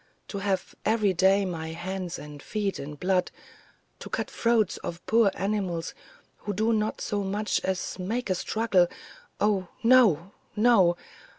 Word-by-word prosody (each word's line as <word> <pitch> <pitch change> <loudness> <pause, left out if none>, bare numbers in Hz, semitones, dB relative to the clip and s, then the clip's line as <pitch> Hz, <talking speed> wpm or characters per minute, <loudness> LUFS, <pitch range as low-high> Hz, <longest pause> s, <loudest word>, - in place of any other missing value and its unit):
To 200 - -4
have 195 -2 -1
every 215 -3 +2
day 195 +3 +4
my 165 -3 -4
hands 180 +1 -4
and 145 -1 -10
feet 205 +2 -2
in 150 +2 -6
blood, 180 +3 +1 0.7
to - - -8
cut - - -2
the - - -17
throats 230 -4 +2
of 170 +1 -7
poor 225 -2 +4
animals 190 -4 -2 0.4
who 205 - -4
do 220 +3 +1
not 215 0 -1
so 205 -1 -1
much 205 +2 -1
as 190 0 -2
make 215 +4 -2
a - - +5
struggle 190 -1 +2 0.5
oh, 200 -3 +1 0.2
no, 215 -8 +5 0.2
no! 210 -6 +4
195 Hz, 155 wpm, -27 LUFS, 180-215 Hz, 0.7 s, a